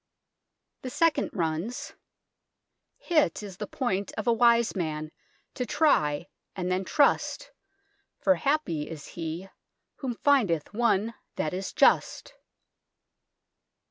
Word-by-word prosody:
The 255 - -5
second 310 +1 +2
runs: 170 +7 -3 0.5
" - - -57 0.4
Hit 305 -9 +1
is 195 -3 -8
the 210 - -5
poynt 200 -7 -2
of 215 - -3
a 235 - +4
wise 235 -1 +4
man 155 -4 -3 0.4
to 250 - -2
try 175 - +2 0.3
and 180 -1 -2
then 185 +1 0
truste, 285 +6 +1 0.7
for 285 - +4
hapy 230 - 0
is 155 -3 -8
he 170 +2 -5 0.5
whome 255 -4 -3
fyndeth 215 - +2
one 230 -1 +1 0.2
that 155 - -2
is 190 +1 -4
just." - - +2
205 Hz, 115 wpm, -27 LUFS, 170-250 Hz, 0.7 s, a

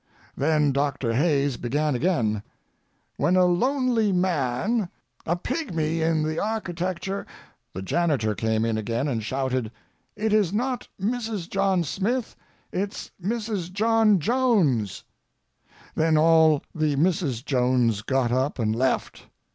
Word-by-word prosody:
Then 150 0 +2
Doctor 135 -3 -1
Hayes 140 -1 +1
began 145 +5 0
again: 120 - 0 0.8
"When 180 - +2
a 185 0 +5
lonely 235 +3 +2
man, 180 - 0 0.4
a 170 - +2
pigmy 165 - -2
in 160 -1 +1
the 155 +1 -1
architecture—" 190 -2 -3 0.5
The 95 - -5
janitor 135 - +1
came 110 +2 0
in 110 -1 0
again 115 +5 -2
and 120 -6 -1
shouted: 130 -1 -2 0.4
"It 215 +1 -1
is 205 -5 +3
not 250 +3 -2
Mrs. 220 -3 -2
John 195 -2 +1
Smith! 220 - -2 0.4
It 195 +2 -2
is - - -8
Mrs. 210 -4 -2
John 220 +1 +3
Jones!" 170 - +1 0.9
Then 160 0 +2
all 160 -1 +5
the 155 -2 0
Mrs. 150 - 0
Jones 125 -5 +2
got 130 +1 0
up 130 +4 0
and 110 -3 0
left. 130 +2 -1
160 Hz, 125 wpm, -25 LUFS, 130-200 Hz, 0.9 s, a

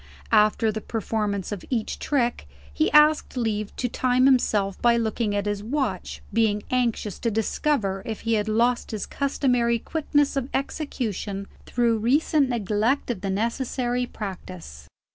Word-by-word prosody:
After 215 0 +4
the 220 +1 -5
performance 210 -3 -2
of 205 -3 -5
each 230 -4 -2
trick, 240 - 0 0.3
he - - +1
asked 300 -2 +4
leave 215 -3 -2
to 250 - -1
time 255 +1 +2
himself 210 -7 +2
by 235 -1 +4
looking 220 -2 -1
at 205 0 -1
his 205 -1 -2
watch; 230 -5 -3
being 215 -2 +2
anxious 235 -5 0
to 230 - 0
discover 215 -2 0
if 220 -2 -5
he 230 - 0
had 210 -1 +1
lost 235 +3 +1
his 215 -3 -3
customary 250 -4 +1
quickness 290 +2 0
of 270 -1 -2
execution 220 - -3 0.2
through 235 -2 +1
recent 280 +4 +2
neglect 230 +3 0
of 200 -6 -5
the 195 - -2
necessary 245 +4 -1
practice. 180 - -8
230 Hz, 145 wpm, -25 LUFS, 205-250 Hz, 0.3 s, After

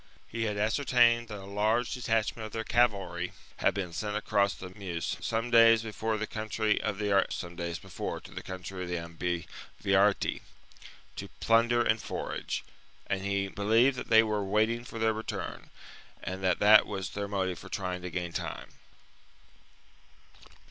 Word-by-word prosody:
He 115 0 -3
had 105 -2 -2
ascertained 120 +1 +3
that 105 -2 -6
a 95 - -9
large 110 +5 +1
detachment 115 -2 -1
of 110 - -15
their 110 - -2
cavalry 110 -4 +1 0.2
had - - +2
been 90 -4 -3
sent 105 +4 -2
across 100 -2 +1
the 90 -1 -9
Meuse 90 -4 -4
some 115 +2 -1
days 115 -1 +7
before 110 0 -2
to - - -3
the 110 - -1
country 110 0 -1
of 105 -2 -2
the 105 0 -1 1.9
Ambivariti, 90 +4 0 0.8
to - - -6
plunder 120 +1 +4
and 110 -1 +2
forage; - - -4 0.4
and 95 - -2
he 100 0 0
believed 110 +7 +3
that 125 - -6
they 110 0 +7
were 105 -2 -1
waiting 110 +4 +1
for 115 - -9
their 110 0 +2
return, 110 +1 -5 0.5
and 95 +1 -5
that 90 -2 +3
that 105 +1 +7
was 95 -3 -4
their 100 0 -3
motive 95 -3 -2
for - - -11
trying 90 -2 -3
to 90 - -5
gain 85 0 -4
time. - - -5
105 Hz, 145 wpm, -30 LUFS, 95-115 Hz, 1.9 s, days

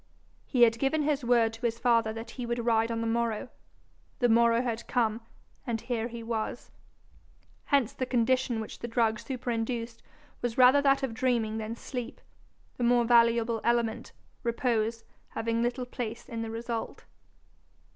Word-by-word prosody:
He 250 -3 +4
had 230 -1 +4
given 295 +3 +1
his 290 -2 0
word 235 -2 +3
to 225 - -11
his 230 -2 -1
father 230 -2 +2
that 225 +1 -7
he 250 - -5
would 235 0 -2
ride 225 -1 +2
on 230 -1 -2
the - - -2
morrow; 230 +1 -1 0.7
the 245 -2 +2
morrow 235 +1 +4
had 235 -2 -3
come, 230 -2 0 0.5
and 230 -2 -1
here 230 -1 -2
he 235 -1 -8
was! 225 +1 -4 0.9
Hence 275 -6 +2
the 255 - -3
condition 250 -1 +1
which 220 - -7
the 235 - -5
drug 225 -2 +1
superinduced 230 -1 -3 0.4
was 240 -2 -2
rather 260 +3 +7
that 275 -1 +3
of 260 -4 -1
dreaming 230 -3 0
than 220 +1 -4
sleep, 245 0 -6 0.6
the 245 - -2
more 240 0 +4
valuable 230 -1 +3
element, 235 -2 0 0.3
repose, 230 -1 0 0.2
having 230 +1 -2
little 245 +1 -1
place 240 -2 -6
in 230 -3 -5
the 225 - -4
result. 230 0 -5
235 Hz, 160 wpm, -29 LUFS, 225-245 Hz, 0.9 s, rather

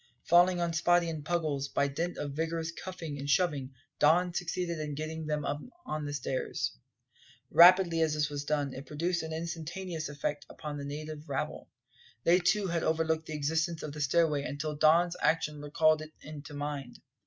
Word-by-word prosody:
Falling 175 +1 +5
on 170 -1 0
Spottie 175 +1 +3
and 155 -2 -6
Puggles, 150 -4 -1
by 140 - +2
dint 165 +6 -3
of 145 - -3
vigorous 160 +2 -2
cuffing 165 -4 -6
and 140 +1 -5
shoving 145 -5 +1 0.2
Don 175 +4 +4
succeeded 175 -1 -2
in 150 -1 -4
getting 155 +1 -4
them 150 -1 -1
on 155 - -5
the 145 - -4
stairs. 135 -1 -2 0.8
Rapidly 175 -1 +7
as 155 -1 +2
this 150 0 +1
was 145 -1 -4
done, 145 -2 -1
it 135 +1 -8
produced 170 +5 -1
an 160 0 -6
instantaneous 165 +1 -4
effect 145 0 -3
upon 150 -1 -6
the 140 - -5
native 150 +1 -6
rabble. 135 - -3 0.5
They 175 +2 +5
too 190 +3 +2
had 170 -2 0
overlooked 160 0 0
the 155 - -4
existence 160 +3 -1
of 150 - -4
the 150 - -5
stairway 150 +1 +2
until 150 +1 -4
Don's 170 +4 +4
action 150 -2 +1
recalled 155 +1 +3
it 155 -1 -10
to 150 - -9
mind. 145 -3 -5
155 Hz, 175 wpm, -30 LUFS, 145-170 Hz, 0.8 s, Rapidly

